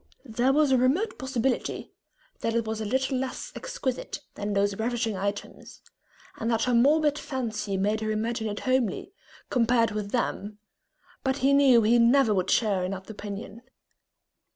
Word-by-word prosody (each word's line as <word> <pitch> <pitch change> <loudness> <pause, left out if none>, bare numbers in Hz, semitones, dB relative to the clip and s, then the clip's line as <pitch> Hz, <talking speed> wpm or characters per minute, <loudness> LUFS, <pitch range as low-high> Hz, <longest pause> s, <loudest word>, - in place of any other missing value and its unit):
There 245 +2 +1
was 295 0 +3
a 260 - +4
remote 305 - +1
possibility 260 -1 -2 0.5
that 230 - -1
it 230 -1 +1
was 220 0 -3
a - - -3
little 260 +3 0
less 260 -1 -4
exquisite 395 - -4
than 205 0 -3
those 200 0 0
ravishing 230 -1 -1
items, 200 +2 -5 0.6
and 225 - -1
that 225 -1 +1
her 250 - +1
morbid 295 +4 +4
fancy 220 -6 -3
made 210 +3 0
her 215 - -2
imagine 220 +1 -1
it 205 - -5
homely, 255 - 0 0.4
compared 230 -2 +3
with 210 -1 -4
them, 210 -3 -2 0.7
but 265 0 0
he 280 - +5
knew 265 -5 +6
he 235 +3 +4
never 235 -1 +5
would 190 -1 0
share 200 -5 +2
in 180 - -2
that 190 +3 -8
opinion. 205 +1 -7
230 Hz, 160 wpm, -27 LUFS, 210-260 Hz, 0.7 s, knew